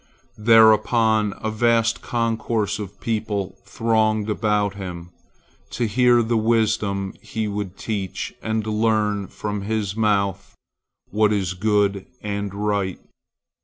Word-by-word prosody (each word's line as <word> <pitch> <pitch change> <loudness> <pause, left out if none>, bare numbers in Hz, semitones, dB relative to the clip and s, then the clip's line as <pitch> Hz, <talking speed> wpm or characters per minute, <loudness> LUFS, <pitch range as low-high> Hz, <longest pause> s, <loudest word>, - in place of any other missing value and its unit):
Thereupon 110 -1 +4
a 110 - -1
vast 115 0 +2
concourse 115 -3 -1
of 100 -1 -8
people 105 -4 -3
thronged 110 -2 +1
about 105 -1 0
him, 90 -3 -7 0.6
to 120 - 0
hear 120 +2 +4
the 115 +1 0
wisdom 110 -3 0
he 110 -1 -3
would 100 -2 -4
teach 100 -4 -4
and 110 -1 -2
learn 105 -2 0
from 105 +1 -4
his 105 -1 -2
mouth 100 -3 0 0.6
what 105 +1 +3
is 95 -4 0
good 100 0 +1 0.2
and 100 -1 -3
right. 100 -2 -2
105 Hz, 115 wpm, -22 LUFS, 100-110 Hz, 0.6 s, Thereupon